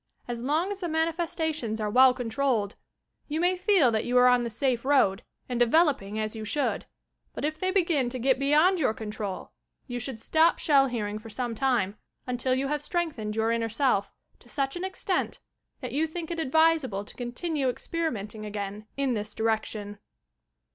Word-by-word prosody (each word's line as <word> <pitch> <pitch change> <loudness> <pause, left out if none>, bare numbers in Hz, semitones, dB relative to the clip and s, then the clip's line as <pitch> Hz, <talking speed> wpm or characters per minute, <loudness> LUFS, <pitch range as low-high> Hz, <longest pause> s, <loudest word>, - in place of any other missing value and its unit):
As 240 -1 -4
long 310 +9 0
as 400 - -5
the 355 - -3
manifestations 320 -7 -1
are 215 - -1
well 260 +3 +7
controlled, 245 -3 -1 0.5
you 310 +2 -2
may 355 +2 +3
feel 360 - +4
that 220 -1 0
you 245 +1 +1
are 250 - +7
on 250 -1 +5
the 235 - -2
safe 240 +1 0
road, 255 -8 +3 0.3
and 245 -1 -2
developing 240 - +3
as 215 0 -2
you 220 - -5
should; 280 +7 -1 0.5
but - - -2
if 310 +1 -2
they 370 - 0
begin 335 -9 +2
to 255 - -4
get 260 +2 +2
beyond 305 +7 +4
your 260 -7 +1
control, 210 -3 -5 0.3
you 245 -2 -4
should 245 -1 -5
stop 320 +8 +3
Shell 275 -3 +4
Hearing 215 -4 -3
for 225 +1 -11
some 240 +2 -3
time, 230 -6 0 0.3
until 250 +1 0
you 270 +1 -1
have 295 0 -1
strengthened 290 -12 -2
your 225 +1 +1
inner 230 -1 0
self, 225 -4 +1 0.3
to 240 - -20
such 275 +1 -2
an 350 - -4
extent, 380 0 -2 0.4
that 250 -3 -5
you 305 +5 +1
think 330 +1 -6
it 335 - -3
advisable 315 -8 +2
to - - -9
continue 265 +3 -2
experimenting 230 -8 -3
again 205 0 -5
in 275 -2 +1
this 210 -1 -4
direction. 215 -2 -2
255 Hz, 180 wpm, -27 LUFS, 220-315 Hz, 0.5 s, well